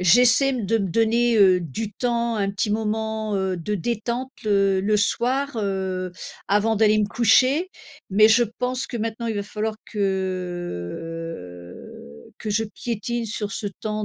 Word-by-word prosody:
j'essaie 245 +9 +6
m 245 -7 -1
de 225 - +2
me 200 -3 -1
donner, 230 +3 +2
heu, 185 -3 +6
du 200 - -5
temps 235 -1 -1
un 195 -1 0
petit 200 +2 -1
moment, 220 0 -1
heu, 190 -1 -1
de 190 +5 -3
détente 235 +6 -3
le 195 -2 +3
le 210 +2 +2
soir, 255 +5 0
heu, 190 -3 -2 0.4
avant 210 +2 +2
d'aller 215 0 +4
me 210 - +2
coucher. 255 - +3 0.4
Mais 215 +3 +6
je 235 +2 +5 0.2
pense 250 +1 -1
que 245 - -5
maintenant 230 +1 -3
il 220 - -2
va 205 - -1
falloir 215 +1 -3
que 165 - -4 0.7
que 215 - -4
je 215 +2 +1
piétine 235 +2 -4
sur 210 -1 -3
ce 205 - -3
temps 215 0 -2
215 Hz, 160 wpm, -23 LUFS, 190-230 Hz, 0.7 s, j'essaie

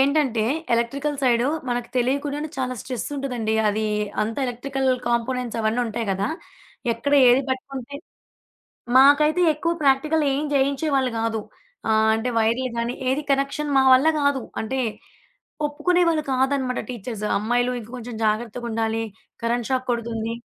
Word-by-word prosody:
ఏంటంటే 270 -5 +2 0.3
electrical 280 +5 -1
side 240 -1 +3 0.2
మనకు 245 -1 -2
తెలియక 260 +3 +2
కూడానే 295 +2 -3
చాలా 255 -1 -1
స్ట్రెస్ 250 +2 -4
ఉంటదండి. 245 -5 -2
అది 215 +1 0 0.4
అంతా 225 +3 -3
ఎలక్ట్రికల్ 265 +2 -2 0.2
కాంపోనెంట్స్ 240 0 -1
అవన్నీ 220 +3 +1
ఉంటాయి 225 0 -3
కదా! 195 +2 -1 0.6
ఎక్కడ 235 +5 -3 0.2
ఏది 250 +3 +5
పట్టుకుంటే 260 +1 -5 1.0
మాకైతే 300 +5 +6
ఎక్కువ 335 +3 -1
ప్రాక్టికలేం 285 +1 +2
చేయించేవాళ్లు 275 -1 +1
కాదు. 225 -1 -1 0.5
ఆహ్, 220 0 +3
అంటే 225 +3 -1
వైర్లు 235 +3 +1
గానీ, 235 +1 -1
ఏదీ 275 +3 +1
కనెక్షన్ 275 +2 0
మా 265 - +6
వల్ల 265 +5 +6
కాదు 285 -2 +1 0.2
అంటే 260 +4 -2 0.9
ఒప్పుకునేవాళ్లు 325 +2 +1
కాదనమాట 260 -1 0
టీచర్స్ 225 -2 -6
అమ్మాయిలు 245 +4 +1
ఇంక 225 0 -12
కొంచెం 240 0 -7
జాగ్రత్తగా 230 +2 -2
ఉండాలి. 225 0 -1 0.4
కరెంట్ 235 -1 -1
షాక్ 255 0 0
కొడుతుంది. 230 -1 -2
250 Hz, 130 wpm, -23 LUFS, 230-275 Hz, 1.0 s, మాకైతే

